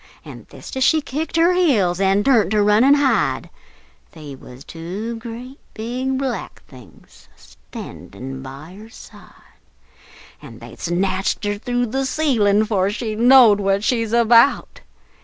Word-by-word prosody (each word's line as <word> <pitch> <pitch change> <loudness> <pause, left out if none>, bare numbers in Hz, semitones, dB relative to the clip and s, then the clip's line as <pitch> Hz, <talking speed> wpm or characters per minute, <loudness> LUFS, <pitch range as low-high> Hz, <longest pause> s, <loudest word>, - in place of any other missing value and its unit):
An' - - -11
thist - - -12
as 260 - 0
she 315 - +3
kicked 305 +3 -5
her 335 +2 +3
heels, 220 - +1
an' 195 +1 +2
turn't 225 -8 +3
to 210 0 +1
run 210 +3 +3
an' 280 +2 +5
hide, 285 -2 0 0.6
They 150 -3 -10
wuz 130 -1 -14
two 190 +10 -7
great 240 +4 -10 0.2
big 255 +4 -3
Black 265 -3 -5
Things 120 - -18
a - - -26
standin' 130 +6 -11
by 140 +7 -11
her 220 +1 -13
side, - - -17 0.8
An' - - -12
they - - -12
snatched 190 +4 -2
her 205 0 -2
through 245 +2 -2
the 265 +3 -2
ceilin' 220 -9 +1
'fore 195 -3 0
she 215 +1 -4
knowed 235 -2 +5
what 195 0 0
she's 230 -2 -1
about! 235 +3 +3
220 Hz, 150 wpm, -19 LUFS, 195-255 Hz, 0.8 s, an